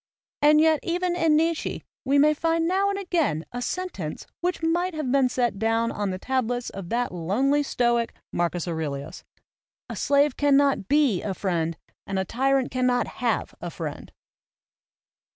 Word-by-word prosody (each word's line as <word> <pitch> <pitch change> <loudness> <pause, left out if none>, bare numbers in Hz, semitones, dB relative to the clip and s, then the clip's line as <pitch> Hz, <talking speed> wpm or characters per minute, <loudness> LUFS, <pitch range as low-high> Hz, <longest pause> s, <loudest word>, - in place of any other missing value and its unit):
And 300 +1 +6
yet 315 -1 +4
even 355 +1 -1
in 325 -3 +3
Nietzsche 325 +1 0 0.2
we 275 +2 +2
may 300 +2 +5
find 330 +2 0
now 385 +3 +2
and 400 - -1
again 330 - 0
a 245 - -5
sentence 245 - -4
which 355 -1 -2
might 345 +2 0
have 300 -5 -2
been 270 -2 +3
set 240 -5 -1
down 225 +1 +1
on 205 -1 -2
the 185 - -3
tablets 245 +2 -2
of 190 -3 -8
that 245 +1 0
lonely 235 - +1
stoic, 240 -4 +1 0.2
Marcus 175 0 -1
Aurelius: 155 -3 -4 0.7
"A - - -5
slave 285 -1 +2
cannot 280 -7 +3
be 280 -9 +3
a 195 -2 -3
friend 165 -4 -1 0.3
and 195 - -2
a 190 - 0
tyrant 265 +5 +1
cannot 250 -1 +1 0.2
have - - 0
a - - -4
friend." - - -7
260 Hz, 160 wpm, -25 LUFS, 200-310 Hz, 0.7 s, And